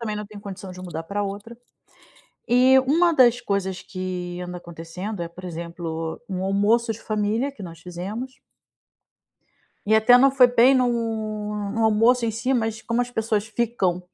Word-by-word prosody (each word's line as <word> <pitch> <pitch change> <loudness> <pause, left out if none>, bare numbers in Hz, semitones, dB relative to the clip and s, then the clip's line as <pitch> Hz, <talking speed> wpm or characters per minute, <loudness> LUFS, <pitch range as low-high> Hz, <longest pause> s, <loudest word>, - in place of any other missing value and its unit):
também 215 -2 -3
não 210 0 -5
tenho 210 0 -11
condição 195 -1 -8
de 180 - -10
mudar 175 -3 -6
pra 200 +4 -3
outra. 205 +4 -6 0.9
E 255 +2 +6
uma 325 +6 +3
das 245 -2 +5
coisas 200 -4 -2
que 180 -2 -5
anda 180 0 -6
acontecendo 175 +4 -7
é, 170 - -4
por 185 +2 -13
exemplo, 165 -1 -5
um 185 -1 -3
almoço 210 +4 +2
de 220 - -11
família 215 +5 -1
que 225 - -12
nós 165 -3 -9
fizemos 195 +9 -6 1.5
e 215 - +4
até 220 +3 +7
não 275 +2 +6
foi 265 -2 +6
bem 245 +2 +5
no 225 -4 -1 0.3
no 225 0 +1
almoço 225 +3 +4
em 230 - +1
si, 240 +5 -1
mas 225 -2 -1
como 230 +1 -1
as 245 - -6
pessoas 220 -3 -1
ficam 220 -6 0
215 Hz, 170 wpm, -23 LUFS, 185-235 Hz, 1.5 s, até